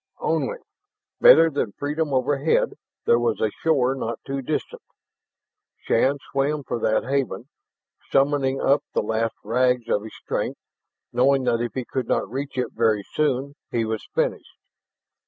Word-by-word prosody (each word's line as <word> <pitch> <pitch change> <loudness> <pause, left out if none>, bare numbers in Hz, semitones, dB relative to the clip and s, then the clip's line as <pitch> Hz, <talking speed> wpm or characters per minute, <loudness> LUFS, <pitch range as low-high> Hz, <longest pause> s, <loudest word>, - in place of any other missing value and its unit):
Only, 485 - 0 0.6
better 165 - +8
than 125 -8 -2
freedom 150 +1 -2
overhead, 140 +3 +1 0.3
there 120 - +4
was 120 - 0
a 110 - +1
shore 135 -5 +2
not 115 -4 -4
too 135 0 -3
distant. 150 +4 -3 1.0
Shann 135 +5 +1
swam 140 +2 0
for 120 - -3
that 110 - +1
haven, 135 0 -2 0.6
summoning 135 -1 +2
up 140 +2 +3
the - - +2
last 110 +1 -1
rags 125 +2 +1
of 105 - +2
his 110 +1 -10
strength, - - -3 0.6
knowing 135 +1 +3
that 115 -2 +1
if 120 - -3
he 130 -2 -3
could 130 0 -3
not - - 0
reach 135 +5 -5
it 125 - -1
very 110 -3 +1
soon 140 -2 0 0.2
he 115 -1 0
was 110 -1 -3
finished. - - -1
130 Hz, 150 wpm, -24 LUFS, 115-140 Hz, 1.0 s, better